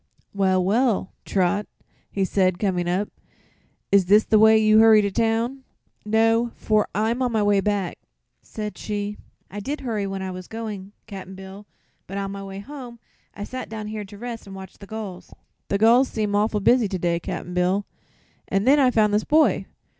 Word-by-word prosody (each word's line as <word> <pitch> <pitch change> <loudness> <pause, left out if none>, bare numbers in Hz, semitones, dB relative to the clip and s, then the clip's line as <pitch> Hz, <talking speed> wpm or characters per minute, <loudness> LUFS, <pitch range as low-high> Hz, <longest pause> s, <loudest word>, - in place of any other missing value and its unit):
"Well, 190 -2 +2
well, 220 -1 +1
Trot," 200 +2 0 0.4
he 195 -1 -1
said, 185 -2 +1
coming 180 -3 -1
up, 190 +4 -1 0.8
"is 195 -3 +4
this 210 +3 +6
the 215 - +3
way 220 0 +7
you 215 0 +5
hurry 220 -1 +7
to 200 - -1
town?" 230 +5 0 0.4
"No, 225 +2 +2
for 215 -1 +1
I'm 225 +4 0
on 250 -1 +1
my 220 -2 +1
way 205 -1 +3
back," 200 -3 -2 0.4
said 210 -1 -7
she. 205 0 -4 0.3
"I 205 - -5
did 280 +9 -4
hurry 215 -6 -2
when 195 0 -4
I 190 - -4
was 185 0 -8
going, 210 -4 -6
Cap'n 190 -2 -9
Bill, 190 +2 -11 0.4
but 195 - -6
on 195 -1 -3
my 200 0 -6
way 195 0 -8
home 245 +2 -9 0.4
I 205 - -6
sat 255 +4 -6
down 215 -1 -6
here 215 -1 -5
to 205 +1 -12
rest 230 -1 -7
an' 195 - -9
watch 190 -1 -11
the 200 - -11
gulls 210 -4 -8 0.3
the 200 - 0
gulls 235 +5 +5
seem 210 -4 -2
awful 210 0 +1
busy 240 +2 +4
to 190 - -3
day, 170 -1 0
Cap'n 175 +1 -6
Bill 180 +3 +1 0.6
an' 195 0 0
then 275 +5 +5
I 260 -2 +5
found 215 -4 +2
this 210 +1 +2
boy." 310 +1 +3
210 Hz, 190 wpm, -23 LUFS, 195-225 Hz, 0.8 s, way